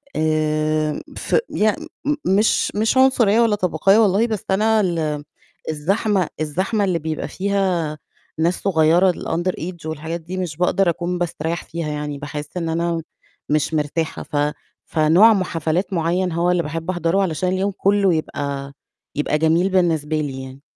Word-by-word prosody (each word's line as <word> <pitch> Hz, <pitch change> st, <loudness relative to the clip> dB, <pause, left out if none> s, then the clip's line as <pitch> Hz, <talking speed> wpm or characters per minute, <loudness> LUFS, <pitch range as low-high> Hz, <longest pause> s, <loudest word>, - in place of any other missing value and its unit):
آآ، 155 Hz, -1 st, 0 dB, 0.2 s
ف -, -, -1 dB
ي 215 Hz, 0 st, +2 dB, 0.5 s
مش 200 Hz, +4 st, +2 dB
مش 220 Hz, +5 st, +1 dB
عنصرية، 235 Hz, -5 st, +4 dB
ولا 225 Hz, -3 st, +3 dB
طبقية 190 Hz, +1 st, +2 dB
والله، 215 Hz, +1 st, +4 dB
بس 215 Hz, -3 st, -3 dB
أنا 220 Hz, +2 st, +3 dB
ال 160 Hz, -6 st, -1 dB, 0.5 s
الزحمة 190 Hz, +4 st, 0 dB
الزحمة 185 Hz, +8 st, 0 dB
اللي 180 Hz, -4 st, +1 dB
بيبقى 155 Hz, 0 st, -3 dB
فيها 185 Hz, -6 st, -1 dB, 0.4 s
ناس 170 Hz, +2 st, +1 dB
صغيرة 175 Hz, 0 st, +4 dB
الunder 175 Hz, +1 st, -2 dB
age 170 Hz, -1 st, -6 dB
والحاجات 160 Hz, +2 st, -4 dB
دي، 180 Hz, +3 st, -6 dB
مش 175 Hz, -5 st, -4 dB
باقدَر 180 Hz, +1 st, +2 dB
أكون 175 Hz, +1 st, -2 dB
باستريّح 170 Hz, -1 st, -3 dB
فيها 165 Hz, -1 st, -5 dB
يعني، 150 Hz, -1 st, -4 dB
باحس 145 Hz, +3 st, -7 dB
إن 165 Hz, -2 st, -2 dB
أنا 170 Hz, 0 st, -1 dB, 0.5 s
مش 150 Hz, +1 st, +1 dB
مرتاحة، 155 Hz, +1 st, -2 dB
ف -, -, -9 dB, 0.5 s
فنوع 170 Hz, +8 st, +5 dB
م 195 Hz, -, +1 dB
حفلات 165 Hz, +3 st, -2 dB
مُعيّن 175 Hz, +2 st, 0 dB
هو 170 Hz, +2 st, +1 dB
اللي 175 Hz, -1 st, +1 dB
باحب 165 Hz, +3 st, -5 dB
أحضره، 175 Hz, +1 st, +1 dB
علشان 180 Hz, -1 st, 0 dB
اليوم 190 Hz, +2 st, 0 dB
كلّه 200 Hz, -2 st, +3 dB
يبقى 140 Hz, -3 st, -3 dB, 0.4 s
يبقى 150 Hz, +1 st, 0 dB
جميل 165 Hz, +4 st, +2 dB
بالنسبة 160 Hz, -5 st, +1 dB
لي 135 Hz, -3 st, -4 dB
يعني، 130 Hz, +1 st, -11 dB
170 Hz, 150 wpm, -21 LUFS, 155-190 Hz, 0.5 s, فنوع